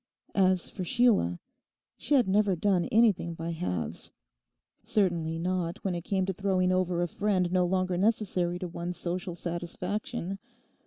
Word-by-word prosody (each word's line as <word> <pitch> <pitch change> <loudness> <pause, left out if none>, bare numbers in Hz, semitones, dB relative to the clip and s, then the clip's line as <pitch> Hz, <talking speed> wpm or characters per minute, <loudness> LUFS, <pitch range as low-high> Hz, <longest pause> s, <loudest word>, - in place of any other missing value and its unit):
As 185 -2 +3
for 185 - -5
Sheila, 205 - +3 0.6
she 295 - 0
had 250 -7 +4
never 200 0 +3
done 180 0 +2
anything 210 -7 +3
by 165 +1 -4
halves; 90 - -4 0.7
certainly 170 -5 0
not 175 0 -1
when 195 - 0
it 170 -1 -4
came 190 -2 0
to 190 - -1
throwing 185 -1 +1
over 180 -1 +1
a - - 0
friend 185 0 0
no 180 -1 +3
longer 185 0 0
necessary 185 -4 +1
to 180 - -4
one's 175 +1 -5
social 175 0 -3
satisfaction. 180 - -4
185 Hz, 150 wpm, -29 LUFS, 175-195 Hz, 0.7 s, had